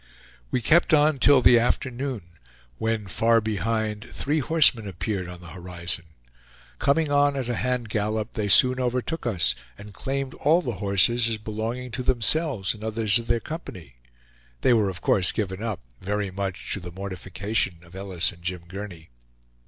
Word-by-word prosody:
We 125 - -1
kept 165 +4 +5
on 150 -1 +3
till 135 -1 +6
the 120 - +7
afternoon, 125 -1 -1 0.6
when, 110 -2 -1
far 115 +4 +3
behind, 110 0 -2
three 145 +5 -2
horsemen 140 -7 +4
appeared 95 0 -3
on 90 0 -10
the 90 - -11
horizon. 90 -1 -5 0.7
Coming 145 +1 +2
on 145 0 +3
at 130 -3 -2
a 120 -2 -1
hand 125 -1 -1
gallop, 105 0 -2
they 105 -2 -2
soon 130 +5 +5
overtook 125 +4 -2
us, 95 -7 +2 0.2
and 105 0 -11
claimed 135 +3 -3
all 165 +5 +2
the 120 -9 -3
horses 105 +4 +3
as 115 - -1
belonging 110 +4 -4
to 125 - -4
themselves 125 - +2
and 110 -1 -12
others 110 0 +1
of 115 - -8
their 120 0 +2
company. 95 - -8 0.6
They 125 - +4
were 105 -4 +3
of 90 - -7
course 90 -3 +4
given 95 -2 -3
up, 110 -5 -3 0.2
very 100 0 -2
much 95 -1 -3
to - - -3
the 90 -1 -8
mortification 95 +1 -2
of 85 0 -17
Ellis 95 -3 -2
and 85 -3 -17
Jim 90 -1 -4
Gurney. 90 -5 -8
110 Hz, 170 wpm, -25 LUFS, 95-125 Hz, 0.7 s, the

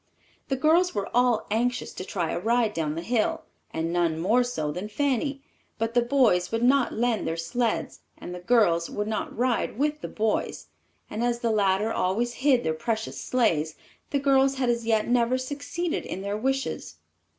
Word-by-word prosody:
The 270 - 0
girls 325 +6 +3
were 200 - -1
all 245 -2 +3
anxious 245 +3 0
to - - -6
try 175 -3 -2
a - - -2
ride 230 +2 +1
down 155 -3 -2
the 165 - -4
hill, 230 +2 0 0.3
and 165 +1 -2
none 170 -2 +1
more 215 +9 +3
so 155 -12 -2
than 185 +7 -5
Fanny; 275 +2 -1 0.3
but 225 +1 -1
the 240 - +4
boys 235 -8 +2
would 225 +1 0
not 260 0 +4
lend 235 -1 0
their 165 - -2
sleds, 165 +1 -1 0.2
and 180 - -8
the 180 - -6
girls 180 -5 +3
would 210 0 -3
not 215 -1 -3
ride 240 -3 0
with 300 +2 0
the - - -4
boys, 220 0 -2 0.4
and 220 - -3
as 240 0 0
the 230 - +1
latter 205 +1 +2
always 230 +7 0
hid 265 -3 +4
their 160 - 0
precious 220 +8 -3
sleighs, 165 -11 +1 0.3
the 285 - 0
girls 270 -1 +3
had 255 -2 +1
as 235 -1 -3
yet 220 -2 +2
never 245 +1 +2
succeeded 285 +6 -3
in 190 - -5
their 200 +1 -2
wishes. 270 +5 -2
230 Hz, 185 wpm, -26 LUFS, 190-255 Hz, 0.4 s, the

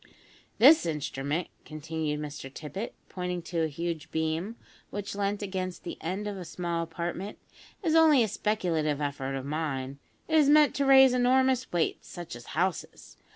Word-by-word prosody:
"This 275 - +7
instrument," 150 +1 -2
continued 155 -1 -4
Mr 145 -3 -7
Tippet, 155 - -6
pointing 180 -1 -4
to 170 0 -3
a 160 - +2
huge 165 +1 -4
beam, 160 +7 -2 0.3
which 205 0 -5
leant 205 +1 -1
against 185 -2 -4
the - - -7
end 190 +5 -3
of 205 - -4
the 185 - -6
small 170 0 -3
apartment, 170 +4 -5 0.5
"is 325 -3 +1
only 315 -6 +6
a - - +1
speculative 170 -8 -1
effort 140 -2 -3
of 135 -1 -4
mine. 140 -3 -3 0.3
It 320 -1 +4
is 290 -2 +4
meant 300 0 +6
to 280 -1 +1
raise 265 -1 +8
enormous 255 +1 +2
weights, 170 -2 -1
such 175 -7 -8
as 120 - -12
houses. 180 0 -2
175 Hz, 160 wpm, -28 LUFS, 155-210 Hz, 0.5 s, raise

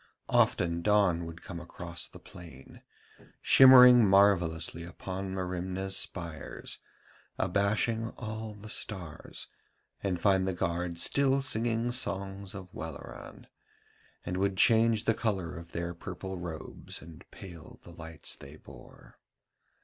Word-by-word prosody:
Often 85 -1 +2
dawn 100 -4 +2
would 85 +1 -10
come 85 - -7
across 85 0 -5
the - - -13
plain, 80 -7 -13 0.6
shimmering 125 -2 +8
marvellously 85 -4 +3
upon 95 +2 -6
Merimna's 95 +1 -3
spires, 85 -4 -4 0.6
abashing 110 +4 0
all 110 -2 -6
the 105 +1 -11
stars, 95 -7 -4 0.5
and 95 -3 -1
find 95 +1 +3
the 95 - -1
guard 85 0 -2
still 135 +8 +2
singing 120 -2 -1
songs 100 -5 -2
of 95 -2 -9
Welleran, 80 -1 -9 0.8
and 90 - -3
would 95 0 0
change 115 +1 +4
the 115 - +3
colour 95 -7 -2
of 85 -1 -10
their 85 +1 -3
purple 95 +2 -7
robes 85 -3 -7
and 80 0 -13
pale 85 -4 -11
the 85 - -12
lights 80 -2 -5
they 70 +2 -12
bore. - - -16
95 Hz, 120 wpm, -30 LUFS, 85-105 Hz, 0.8 s, shimmering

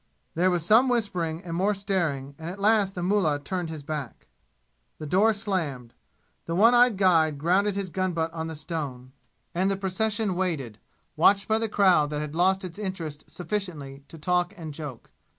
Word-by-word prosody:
There 180 +3 +2
was 175 -3 0
some 230 +7 +5
whispering 180 -8 -1
and 165 -2 -5
more 200 +4 +1
staring, 170 -9 -2
and 160 +1 -5
at 190 +3 -8
last 205 -2 +3
the 175 - -3
mullah 180 -6 +2
turned 175 +3 -4
his 155 -2 -7
back. 145 -4 -6 0.7
The 155 - -7
door 195 +8 +3
slammed. 165 - -3 0.5
The 165 - -2
one 225 +6 +6
eyed 245 -3 +5
guide 165 -6 +3
grounded 190 +7 +2
his 195 -3 -3
gun 185 0 -1
butt 165 0 -2
on 160 -1 -4
the 160 - -6
stone, 145 -6 -5 0.4
and 185 +3 +1
the 195 - 0
procession 205 +2 -1
waited, 160 - -3 0.4
watched 200 -1 +4
by 220 0 +2
the 225 -1 -2
crowd 180 -8 +4
that 150 0 -3
had 150 -1 -5
lost 190 +3 +2
its 185 +3 -8
interest 165 -7 -5
sufficiently 165 -7 -5
to 165 - -12
talk 180 +4 0
and 160 -3 -7
joke. 145 -6 -8
180 Hz, 185 wpm, -26 LUFS, 155-200 Hz, 0.7 s, one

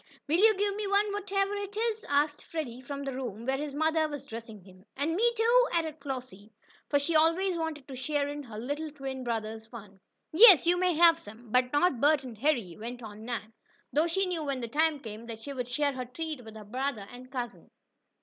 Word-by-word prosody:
"Will 320 +4 +2
you 435 0 +6
give 405 0 0
me 420 -1 -3
one 405 +1 +2
whatever 395 0 0
it 405 0 -5
is?" 450 -1 -1
asked 290 +1 +1
Freddie 260 -7 -5
from 280 +2 -6
the 275 -1 -3
room 235 -4 -5
where 265 +1 0
his 290 -1 -4
mother 315 +1 +2
was 290 -2 -6
dressing 225 -3 -8
him. 185 0 -17
"And 295 +4 0
me, 470 +5 +3
too?" 480 +3 +5
added 320 -2 -1
Flossie, 250 -7 -7 0.4
for 285 - +4
she 285 +4 -1
always 335 +4 +3
wanted 320 -4 -4
to 265 - -7
share 285 +2 -1
in 290 0 -5
her 230 -6 -9
little 290 +7 -3
twin 270 -3 -6
brother's 220 -2 -3
fun. 210 -4 -12 0.3
"Yes, 380 -1 +9
you 350 +1 +4
may 360 -1 +2
have 330 0 +6
some, 220 -2 -13
but 250 +1 +3
not 290 -3 +2
Bert 290 -1 +4
and 235 -5 -9
Harry," 235 - +1
went 240 +2 -7
on 215 0 -9
Nan, 225 -2 -5 0.4
though 310 +3 +3
she 385 +4 +1
knew 350 -4 -2
when 275 -3 -2
the 235 - -3
time 310 +4 +2
came, 225 0 -8
that 225 -1 -7
she 280 - -5
would 250 -3 -4
share 285 +3 0
her 255 -1 -4
treat 300 +1 -5
with 220 -1 -11
her 215 -1 -9
brother 245 -2 -3
and 250 +1 -11
cousin. 245 -3 -5
285 Hz, 220 wpm, -29 LUFS, 240-330 Hz, 0.4 s, Yes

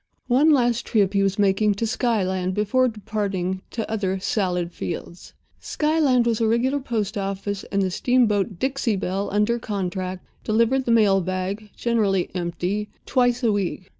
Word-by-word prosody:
One 265 +6 +4
last 245 -5 +2
trip 200 -3 +2
he 200 - +2
was 195 0 +1
making 205 +1 +2
to 230 - -1
Skyland 190 -6 0
before 255 +5 +2
departing 200 -4 -3
to 225 -2 -4
other 195 -3 -1
salad 180 -3 -1
fields. 170 +1 -7 0.2
Skyland 300 -6 +2
was 230 -1 0
a 225 - +3
regular 250 +5 +1
post 220 -5 -2
office, 195 0 -3
and 200 -1 0
the 185 - -1
steamboat, 215 -3 +1
Dixie 265 -1 0
Belle, 195 +1 -2
under 210 +4 +1
contract, 185 -3 -4 0.2
delivered 230 +4 +2
the 235 - +1
mail 205 -4 +4
bag 185 +4 -3
(generally 205 -6 +1
empty) 180 +4 -2 0.2
twice 245 -1 +1
a 230 - +3
week. 195 -2 -2
210 Hz, 155 wpm, -23 LUFS, 190-235 Hz, 0.2 s, One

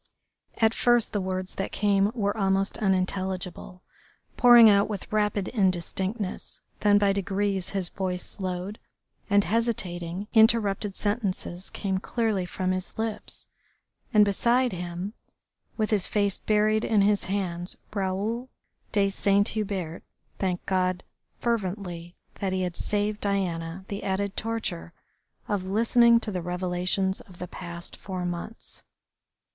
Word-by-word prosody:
At 225 0 +3
first 240 -1 +3
the 205 - 0
words 185 0 -3
that 195 - -3
came 200 0 +2
were 205 -3 0
almost 195 -1 +1
unintelligible, 185 -2 -2 0.5
pouring 240 -2 +9
out 200 0 +5
with 210 0 -6
rapid 210 -2 +1
indistinctness, 190 0 -1 0.2
then 205 -1 +5
by 200 -1 +3
degrees 195 -1 -1
his 190 -3 -2
voice 185 -2 -3
slowed, 185 +1 -5 0.5
and 200 0 +5
hesitating, 195 -5 -1
interrupted 215 -3 +4
sentences 200 -4 -2
came 190 -2 -2
clearly 215 -4 -1
from 185 +1 -1
his 185 0 -3
lips. 220 -1 -2 0.7
And 210 -3 +6
beside 240 +5 +2
him, 180 +3 -5 0.6
with 215 -1 0
his 205 -4 +3
face 200 -2 +1
buried 215 +1 +2
in 210 -3 +3
his 205 0 +3
hands, 180 -3 -3 0.2
Raoul 205 +5 -2 0.4
de 200 -2 +2
Saint 200 +1 +2
Hubert 195 -6 -3 0.4
thanked 185 -2 -1
God 185 -1 0 0.4
fervently 185 -6 -3 0.2
that 190 -2 -1
he 185 0 0
had 180 -2 -3
saved 210 0 -1
Diana 185 -3 -2
the 200 - -4
added 200 +1 -1
torture 220 - -3 0.5
of 200 -3 -1
listening 235 +4 +5
to 215 - -3
the 180 -2 -2
revelations 180 +2 -1
of 185 -3 -16
the 180 - -6
past 170 -1 -7
four 185 -2 -5
months. 175 +6 -6
195 Hz, 130 wpm, -27 LUFS, 185-210 Hz, 0.7 s, pouring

